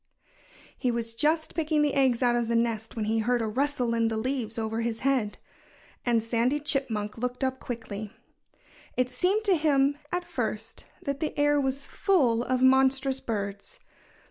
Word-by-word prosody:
He 255 Hz, -, -1 dB
was 230 Hz, -1 st, -1 dB
just 310 Hz, +6 st, +1 dB
picking 310 Hz, -2 st, +1 dB
the 290 Hz, -, +1 dB
eggs 260 Hz, -3 st, +2 dB
out 240 Hz, -1 st, +3 dB
of 240 Hz, -1 st, 0 dB
the 235 Hz, -, 0 dB
nest 230 Hz, -1 st, -1 dB
when 220 Hz, -2 st, -2 dB
he 220 Hz, +1 st, +1 dB
heard 245 Hz, +2 st, +1 dB
a 225 Hz, -, -1 dB
rustle 250 Hz, +1 st, 0 dB
in 230 Hz, -1 st, +2 dB
the 225 Hz, -1 st, -1 dB
leaves 235 Hz, -1 st, -2 dB
over 225 Hz, 0 st, -2 dB
his 230 Hz, -1 st, -2 dB
head. 260 Hz, -6 st, +1 dB, 0.7 s
And 235 Hz, -2 st, +2 dB
Sandy 235 Hz, +5 st, +1 dB
Chipmunk 235 Hz, -8 st, -1 dB
looked 250 Hz, +2 st, -3 dB
up 260 Hz, 0 st, -1 dB
quickly. 220 Hz, -3 st, -6 dB, 0.9 s
It 255 Hz, 0 st, +1 dB
seemed 395 Hz, +4 st, +1 dB
to 400 Hz, -3 st, +4 dB
him, 285 Hz, -2 st, +2 dB
at 355 Hz, 0 st, -1 dB
first, 225 Hz, -8 st, -4 dB, 0.2 s
that 280 Hz, -1 st, -2 dB
the 310 Hz, -, -3 dB
air 290 Hz, 0 st, +3 dB
was 270 Hz, 0 st, -2 dB
full 265 Hz, -, +2 dB
of 255 Hz, +1 st, 0 dB
monstrous 265 Hz, 0 st, +4 dB
birds. 205 Hz, -, -4 dB
250 Hz, 170 wpm, -27 LUFS, 225-280 Hz, 0.9 s, to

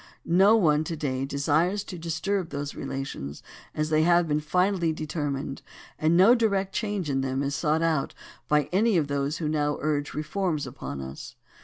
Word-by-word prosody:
No 195 Hz, +6 st, +5 dB
one 155 Hz, -8 st, +3 dB
to 165 Hz, -, -3 dB
day 135 Hz, -3 st, -2 dB
desires 155 Hz, +8 st, +1 dB
to 185 Hz, -, -8 dB
disturb 170 Hz, +3 st, -2 dB
those 145 Hz, -1 st, -4 dB
relations 135 Hz, -, -6 dB, 0.3 s
as 155 Hz, +1 st, -1 dB
they 155 Hz, 0 st, +4 dB
have 170 Hz, +1 st, +4 dB
been 150 Hz, 0 st, +1 dB
finally 180 Hz, +2 st, +1 dB
determined, 145 Hz, -3 st, -4 dB, 0.4 s
and 160 Hz, +2 st, +3 dB
no 195 Hz, +6 st, +7 dB
direct 200 Hz, -5 st, +1 dB
change 205 Hz, -6 st, -2 dB
in 135 Hz, -2 st, 0 dB
them 135 Hz, +1 st, -1 dB
is 140 Hz, 0 st, -2 dB
sought 155 Hz, 0 st, 0 dB, 0.3 s
by 150 Hz, +2 st, +3 dB
any 205 Hz, +2 st, +3 dB
of 155 Hz, -, +2 dB
those 140 Hz, +1 st, -1 dB
who 160 Hz, -, -2 dB
now 150 Hz, -1 st, 0 dB
urge 145 Hz, -1 st, -1 dB
reforms 155 Hz, 0 st, -1 dB
upon 120 Hz, -, -6 dB
us. 65 Hz, +1 st, -8 dB
155 Hz, 170 wpm, -26 LUFS, 140-180 Hz, 0.4 s, no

